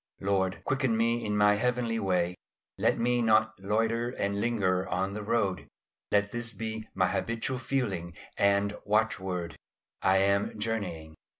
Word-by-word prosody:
Lord, 95 Hz, -1 st, 0 dB
quicken 130 Hz, -4 st, +1 dB
me 115 Hz, +1 st, +1 dB
in 105 Hz, -1 st, -1 dB
my 105 Hz, 0 st, +5 dB
heavenly 120 Hz, -1 st, 0 dB
way; 90 Hz, -3 st, +1 dB, 0.5 s
let -, -, +2 dB
me 120 Hz, +1 st, +2 dB
not 110 Hz, -1 st, +3 dB
loiter 115 Hz, +4 st, 0 dB
or 100 Hz, -, +1 dB
linger 100 Hz, -3 st, 0 dB
on 95 Hz, +2 st, -1 dB
the 105 Hz, -, -4 dB
road. 105 Hz, -3 st, 0 dB, 0.4 s
Let 105 Hz, 0 st, +2 dB
this 120 Hz, -1 st, -4 dB
be 110 Hz, +1 st, -5 dB
my -, -, +3 dB
habitual 115 Hz, +3 st, -2 dB
feeling 100 Hz, -10 st, -2 dB, 0.2 s
and 100 Hz, +1 st, +2 dB
watchword, 95 Hz, -5 st, -1 dB, 0.4 s
"I 95 Hz, 0 st, +4 dB
am 100 Hz, +2 st, +2 dB
journeying." 100 Hz, -8 st, -3 dB
105 Hz, 140 wpm, -29 LUFS, 95-115 Hz, 0.5 s, my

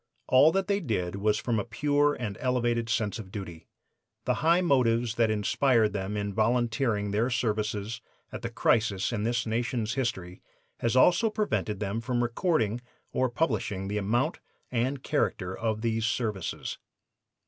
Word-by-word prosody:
All 135 Hz, +5 st, +6 dB
that 195 Hz, 0 st, +1 dB
they 200 Hz, 0 st, +1 dB
did 100 Hz, -, -2 dB
was 105 Hz, +1 st, +2 dB
from 115 Hz, 0 st, 0 dB
a -, -, -1 dB
pure 145 Hz, +5 st, +1 dB
and 105 Hz, -5 st, -4 dB
elevated 120 Hz, -2 st, 0 dB
sense 110 Hz, 0 st, 0 dB
of 95 Hz, -4 st, -9 dB
duty. 85 Hz, -6 st, -8 dB, 0.6 s
The -, -, +2 dB
high 170 Hz, +3 st, +4 dB
motives 120 Hz, -8 st, +2 dB
that 115 Hz, -1 st, +2 dB
inspired 110 Hz, +1 st, +2 dB
them 100 Hz, +1 st, -3 dB
in 100 Hz, -1 st, -2 dB
volunteering 115 Hz, -1 st, +1 dB
their 110 Hz, +5 st, +1 dB
services 110 Hz, -2 st, -1 dB, 0.3 s
at -, -, -6 dB
the -, -, -3 dB
crisis 105 Hz, -1 st, +1 dB
in 105 Hz, -2 st, -1 dB
this 120 Hz, 0 st, 0 dB
nation's 115 Hz, 0 st, -1 dB
history 95 Hz, -9 st, -3 dB, 0.4 s
has 115 Hz, 0 st, 0 dB
also 180 Hz, -, +5 dB
prevented 205 Hz, -, -1 dB
them 105 Hz, +2 st, -2 dB
from 120 Hz, 0 st, 0 dB
recording 120 Hz, -, 0 dB, 0.3 s
or 130 Hz, 0 st, +1 dB
publishing 110 Hz, -8 st, -1 dB
the 105 Hz, +1 st, -1 dB
amount 110 Hz, +5 st, 0 dB, 0.3 s
and 125 Hz, +3 st, -1 dB
character 95 Hz, -10 st, -1 dB
of 110 Hz, -1 st, -2 dB
these 115 Hz, -1 st, 0 dB
services. 110 Hz, -6 st, -3 dB
115 Hz, 155 wpm, -28 LUFS, 105-125 Hz, 0.6 s, All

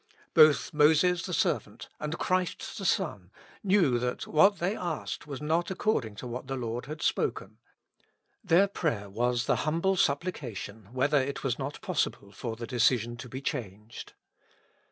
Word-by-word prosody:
Both 155 Hz, -3 st, +5 dB
Moses 160 Hz, +4 st, +4 dB
the -, -, -5 dB
servant -, -, -1 dB
and 150 Hz, +2 st, -3 dB
Christ 185 Hz, +4 st, -1 dB
the 195 Hz, -, -5 dB
Son 105 Hz, -, 0 dB, 0.3 s
knew 180 Hz, -11 st, +3 dB
that 125 Hz, +1 st, -2 dB
what 195 Hz, +6 st, +4 dB
they 185 Hz, +5 st, -1 dB
asked 170 Hz, -5 st, -4 dB
was 145 Hz, 0 st, -6 dB
not 165 Hz, +3 st, +1 dB
according 190 Hz, -, -1 dB
to 115 Hz, -, -8 dB
what 125 Hz, +2 st, -6 dB
the 135 Hz, -, -3 dB
Lord 120 Hz, 0 st, -4 dB
had 155 Hz, +2 st, -6 dB
spoken; -, -, -1 dB, 0.8 s
their 185 Hz, +1 st, +4 dB
prayer 115 Hz, -, -2 dB
was 120 Hz, +3 st, 0 dB
the -, -, +2 dB
humble 170 Hz, +5 st, +1 dB
supplication 130 Hz, -, -2 dB
whether 140 Hz, +4 st, +2 dB
it 140 Hz, +1 st, -3 dB
was 130 Hz, -2 st, -1 dB
not 140 Hz, +2 st, -4 dB
pos -, -, +1 dB
sible 100 Hz, 0 st, -12 dB
for 115 Hz, +3 st, -5 dB
the 115 Hz, +1 st, -6 dB
decision 120 Hz, 0 st, +2 dB
to 125 Hz, +2 st, -9 dB
be 130 Hz, +2 st, -7 dB
changed. 105 Hz, -2 st, -6 dB
140 Hz, 160 wpm, -29 LUFS, 120-170 Hz, 0.8 s, Both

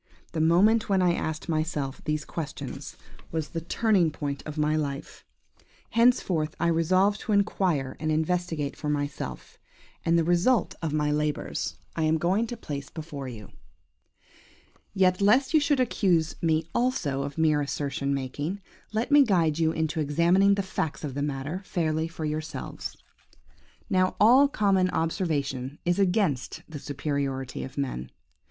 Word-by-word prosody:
the 160 Hz, -, -1 dB
moment 205 Hz, +8 st, +4 dB
when 195 Hz, -1 st, +3 dB
I 180 Hz, -2 st, +3 dB
asked 160 Hz, -2 st, -3 dB
myself 155 Hz, -4 st, -2 dB
these 150 Hz, -1 st, -1 dB
questions 155 Hz, -4 st, -6 dB, 0.3 s
was 160 Hz, -2 st, -2 dB
the 165 Hz, -, -4 dB
turning 190 Hz, 0 st, +2 dB
point 145 Hz, -2 st, -4 dB
of 155 Hz, 0 st, -6 dB
my 150 Hz, 0 st, +2 dB
life. 145 Hz, -1 st, -4 dB, 0.7 s
Henceforth 195 Hz, -10 st, +2 dB
I 170 Hz, -, +2 dB
resolved 185 Hz, +5 st, +2 dB
to -, -, -4 dB
inquire 180 Hz, -9 st, +1 dB
and 155 Hz, +1 st, -1 dB
investigate 160 Hz, -2 st, -1 dB
for 150 Hz, -, -4 dB
myself, 145 Hz, -1 st, -4 dB, 0.4 s
and 170 Hz, 0 st, +3 dB
the 165 Hz, -, +3 dB
result 175 Hz, +7 st, +2 dB
of 160 Hz, -2 st, -2 dB
my 150 Hz, -1 st, +1 dB
labours 150 Hz, 0 st, -2 dB, 0.2 s
I 165 Hz, -, -1 dB
am 155 Hz, +1 st, +3 dB
going 190 Hz, +8 st, +1 dB
to 240 Hz, -, -6 dB
place 140 Hz, -8 st, -6 dB
before 150 Hz, -4 st, -7 dB
you. 110 Hz, -4 st, -9 dB, 1.4 s
"Yet, 185 Hz, -1 st, +3 dB
lest 255 Hz, +9 st, +4 dB
you 310 Hz, -, +7 dB
should 290 Hz, -2 st, +2 dB
accuse 180 Hz, -9 st, +2 dB
me 160 Hz, -1 st, +2 dB
also 210 Hz, -, 0 dB
of 140 Hz, +1 st, -5 dB
mere 155 Hz, -2 st, +3 dB
assertion 140 Hz, -1 st, -2 dB
making, 140 Hz, +7 st, -3 dB, 0.3 s
let 225 Hz, +6 st, -1 dB
me 290 Hz, 0 st, +8 dB
guide 170 Hz, -, +2 dB
you 160 Hz, -1 st, +3 dB
into 160 Hz, 0 st, -1 dB
examining 170 Hz, +7 st, +3 dB
the 200 Hz, -, -1 dB
facts 160 Hz, -5 st, -3 dB
of 145 Hz, -3 st, -4 dB
the 140 Hz, -, -3 dB
matter 145 Hz, +5 st, -3 dB
fairly 160 Hz, -3 st, -1 dB
for 165 Hz, -1 st, -6 dB
yourselves. 155 Hz, +1 st, -5 dB, 0.9 s
"Now 185 Hz, -3 st, +2 dB
all 250 Hz, +7 st, +7 dB
common 195 Hz, -7 st, +2 dB
observation 145 Hz, -6 st, -1 dB
is 175 Hz, +2 st, +1 dB
against 180 Hz, -, +1 dB
the 155 Hz, -3 st, -7 dB
superiority 140 Hz, -2 st, -3 dB
of 130 Hz, -, -9 dB
man. 65 Hz, -, -3 dB
160 Hz, 150 wpm, -27 LUFS, 145-185 Hz, 1.4 s, me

